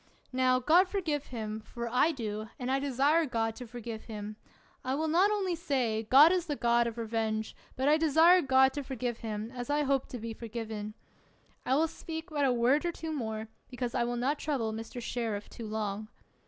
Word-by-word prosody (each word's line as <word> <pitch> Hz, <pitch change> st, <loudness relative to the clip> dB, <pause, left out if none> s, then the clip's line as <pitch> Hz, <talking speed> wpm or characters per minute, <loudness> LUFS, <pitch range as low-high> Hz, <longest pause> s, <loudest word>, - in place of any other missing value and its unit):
Now, 255 Hz, 0 st, +3 dB
God 330 Hz, +9 st, +4 dB
forgive 330 Hz, -8 st, -2 dB
him, 220 Hz, -3 st, -5 dB
for 235 Hz, +2 st, -6 dB
I 250 Hz, +7 st, +3 dB
do, 215 Hz, -5 st, -5 dB
and 255 Hz, -2 st, -3 dB
I 270 Hz, -, +2 dB
desire 285 Hz, +4 st, +2 dB
God 225 Hz, -3 st, -1 dB
to 250 Hz, -, -8 dB
forgive 230 Hz, -1 st, -7 dB
him. 210 Hz, -1 st, -6 dB, 0.5 s
I 260 Hz, +1 st, -1 dB
will 315 Hz, +2 st, -1 dB
not 355 Hz, +6 st, +4 dB
only 400 Hz, -4 st, 0 dB
say, 245 Hz, -9 st, -1 dB
God 290 Hz, +5 st, +8 dB
is 360 Hz, -2 st, 0 dB
the 295 Hz, -, -1 dB
God 235 Hz, -2 st, +2 dB
of 230 Hz, 0 st, -5 dB
revenge, 220 Hz, -1 st, -2 dB, 0.2 s
but 265 Hz, +2 st, 0 dB
I 300 Hz, +1 st, +5 dB
de 320 Hz, 0 st, +1 dB
sire 335 Hz, +5 st, +6 dB
God 265 Hz, -1 st, +4 dB
to 290 Hz, -, -3 dB
forgive 250 Hz, -3 st, -4 dB
him, 220 Hz, 0 st, -4 dB
as 245 Hz, 0 st, -6 dB
I 295 Hz, +1 st, +2 dB
hope 275 Hz, -1 st, +1 dB
to 250 Hz, -, -6 dB
be 230 Hz, 0 st, -5 dB
forgiven. 220 Hz, -2 st, -6 dB, 0.7 s
I 260 Hz, -, +3 dB
will 320 Hz, +3 st, +3 dB
speak 320 Hz, +1 st, -7 dB
but 290 Hz, -2 st, +1 dB
a 260 Hz, -, +3 dB
word 245 Hz, +5 st, +3 dB
or 345 Hz, -, 0 dB
two 325 Hz, -1 st, -6 dB
more, 220 Hz, -5 st, -3 dB, 0.2 s
because 250 Hz, -1 st, -4 dB
I 245 Hz, -, +1 dB
will 240 Hz, 0 st, -2 dB
not 275 Hz, +5 st, 0 dB
trouble 245 Hz, -8 st, -1 dB
Mr. 225 Hz, +2 st, -6 dB
Sheriff 225 Hz, -4 st, -3 dB
too 230 Hz, -, -8 dB
long. 215 Hz, -1 st, -3 dB
250 Hz, 210 wpm, -30 LUFS, 225-295 Hz, 0.7 s, God